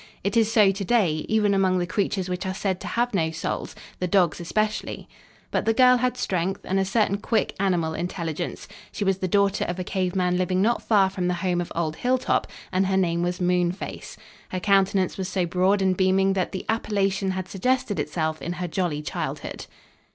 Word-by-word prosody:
It 200 - -1
is 225 -1 +3
so 210 -4 +5
to 195 +1 -4
day, 180 -8 +1
even 210 -2 +3
among 190 -1 +2
the 175 - 0
creatures 195 -1 -1
which 180 0 -3
are 190 - -3
said 190 -2 -1
to - - -6
have 240 0 0
no 165 -5 +1
souls, 160 0 -4 0.2
the 180 - -1
dogs 180 -2 +2
especially. 215 +5 -2 0.4
But - - 0
the 225 - +2
girl 250 0 +6
had 250 +1 0
strength 190 -3 -1
and 190 +1 0
a 195 - +1
certain 200 0 +1
quick, 225 - 0
animal 175 -5 +1
intelligence. 170 -1 -4 0.2
She - - -3
was 195 -1 +1
the 185 - -1
daughter 200 +1 +2
of 175 - -3
a 185 - -3
cave 185 0 -2
man 180 -1 +1
living 185 0 +1
not 230 +5 +2
far 195 -4 +3
from 185 -2 -2
the 180 - +1
home 175 -1 +1
of 175 - -6
old 160 -2 -1
Hilltop, 255 +1 +1 0.2
and 185 +1 +1
her 190 0 +1
name 170 -2 +1
was 175 +1 -1
Moonface. 180 0 -1 0.3
Her 185 - -3
countenance 195 -1 +2
was 190 -1 -2
so 185 -1 0
broad 185 +3 +2
and 190 -1 +2
beaming 190 +1 +3
that 185 -2 -1
the 190 - -5
appellation 200 -3 0
had 185 -1 -4
suggested 250 +3 0
itself 160 -2 -2
in 170 - -3
her 180 0 -4
jolly 165 -3 -2
childhood. - - -5
190 Hz, 205 wpm, -25 LUFS, 180-200 Hz, 0.4 s, girl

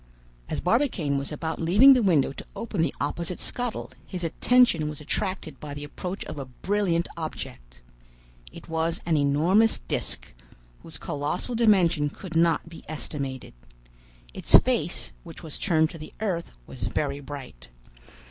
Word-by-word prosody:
"As - - -1
Barbicane 180 - +1
was 140 - -3
about 160 +2 -3
leaving 205 +12 +8
the 255 - +3
window 165 -10 +3
to 135 - -9
open 215 -6 -2
the 165 - 0
opposite 170 +1 -2
scuttle, 245 -2 -3
his 180 -2 -6
attention 170 -2 +4
was 150 - -7
attracted 170 -1 -3
by 145 -1 -7
the 145 - -6
approach 180 +6 -5
of 150 - -6
a 135 - -4
brilliant 170 +5 0
object. - - -7 0.7
It - - -12
was 165 0 0
an 165 -2 +2
enormous 160 +10 +4
disc, - - -4 0.5
whose - - -10
colossal 150 - -3
dimension 180 -10 +4
could 170 +2 -9
not 165 0 +3
be 165 0 -11
estimated. 140 -4 -5 0.8
Its - - +3
face, - - +3
which - - -11
was 155 -3 -7
turned 160 -4 +2
to 165 - -9
the 155 - -10
earth, 185 -6 -2
was - - -11
very 140 -1 -1
bright. 135 - -9
165 Hz, 150 wpm, -26 LUFS, 145-190 Hz, 0.8 s, leaving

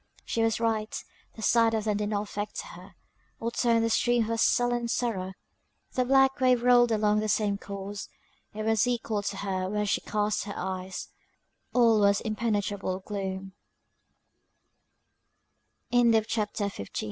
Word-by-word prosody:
She 230 - -1
was 225 0 +1
right; 220 -2 -1 0.4
the 220 - -8
sight 230 0 +4
of 220 - -1
them 210 -1 0
did 210 0 -2
not 205 -1 -1
affect 205 0 -5
her, - - -13 0.4
or 230 +1 -2
turn 230 -1 +2
the 230 - +1
stream 240 +1 +3
of 220 - -5
her 230 - 0
sullen 240 +1 +2
sorrow; 200 -6 -2 0.6
the 255 - +1
black 270 +1 +4
wave 255 -2 +3
rolled 245 -1 +5
along 210 -1 +2
in - - +1
the 215 - -2
same 205 -1 +1
course, 200 0 -7 0.4
it 215 +1 -5
was 220 +2 +2
equal 225 -3 -1
to 200 0 -4
her 190 -2 -2
where 210 +1 -1
she 205 - 0
cast 210 0 -1
her 205 - -6
eyes; 185 0 -5 0.6
all 230 -3 +5
was 200 -1 +4
impenetrable 205 -4 -2
gl 195 -1 -4
215 Hz, 145 wpm, -28 LUFS, 200-230 Hz, 0.6 s, rolled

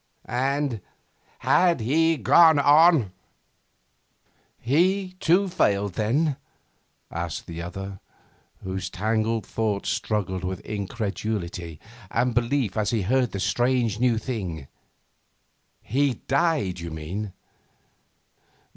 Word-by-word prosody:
And, 135 -2 -1 0.6
had 175 -4 +3
he 160 +8 +2
gone 160 - +6
on 145 - +5 0.7
' - - -42
'He, 185 +8 +1
too, 185 +4 +3
failed 100 - +1
then?' 135 - 0 0.7
asked 85 -1 -4
the 85 0 -7
other, 95 +3 -7 0.6
whose 95 0 -4
tangled 110 +3 -1
thoughts 105 -3 -2
struggled 95 -4 -2
with 90 -1 -3
incredulity 100 -5 -4 0.3
and 125 +3 0
belief 120 -2 0
as 105 -1 +1
he 110 -4 0
heard 125 +4 +1
this 100 - -3
strange 120 -3 +1
new 120 -2 +2
thing. 95 - -4 1.2
'He 135 +1 +1
died, 140 - +1
you 85 0 -6
mean? 90 +6 -5
110 Hz, 100 wpm, -25 LUFS, 95-140 Hz, 1.2 s, gone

